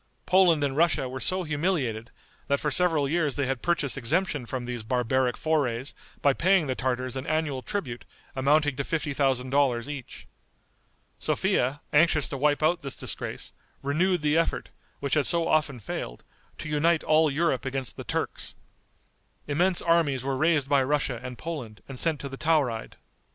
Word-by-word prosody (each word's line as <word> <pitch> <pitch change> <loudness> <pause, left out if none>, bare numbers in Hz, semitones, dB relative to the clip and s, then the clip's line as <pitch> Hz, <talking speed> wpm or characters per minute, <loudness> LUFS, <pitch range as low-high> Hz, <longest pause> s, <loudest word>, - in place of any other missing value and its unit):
Poland 180 -5 +4
and 135 -2 -1
Russia 160 -4 +2
were 130 +1 -6
so 185 +9 0
humiliated, 145 - -1 0.4
that 140 0 +1
for 150 - -1
several 160 -3 +2
years 155 -2 0
they 140 - 0
had 130 -1 -2
purchased 150 -7 0
exemption 145 0 0
from 125 -1 -4
these 120 -1 -4
barbaric 125 +2 0
forays 140 -5 -1 0.3
by 140 - +5
paying 185 +2 +3
the 130 - -1
Tartars 130 0 -2
an 130 +1 -5
annual 155 -4 -1
tribute 130 - -4 0.3
amounting 145 +1 +2
to 140 - -1
fifty 155 -1 -2
thousand 130 -2 0
dollars 135 -3 +2
each. 145 -4 -8 0.9
Sophia, 135 +4 0
anxious 155 -1 +4
to - - -4
wipe 145 +2 +1
out 170 +2 +2
this 135 -4 -5
disgrace, - - -2 0.3
renewed 170 +4 +1
the 150 0 +2
effort, 165 - -1 0.3
which 140 -1 -2
had 150 -2 +3
so 170 -1 +3
often 145 -5 +1
failed, - - -6 0.3
to - - -6
unite 155 +2 +2
all 155 0 +4
Europe 145 -2 0
against 135 -1 -4
the - - -7
Turks. - - -4 0.9
Immense 175 +5 +2
armies 160 -6 +2
were 135 0 -1
raised 155 0 +2
by 140 -1 +3
Russia 130 -3 0
and 125 -1 -7
Poland 130 -10 -6
and 135 -2 -6
sent 160 -3 +1
to 140 - -4
the 135 0 -8
Tauride. 140 -9 0
145 Hz, 170 wpm, -27 LUFS, 130-160 Hz, 0.9 s, by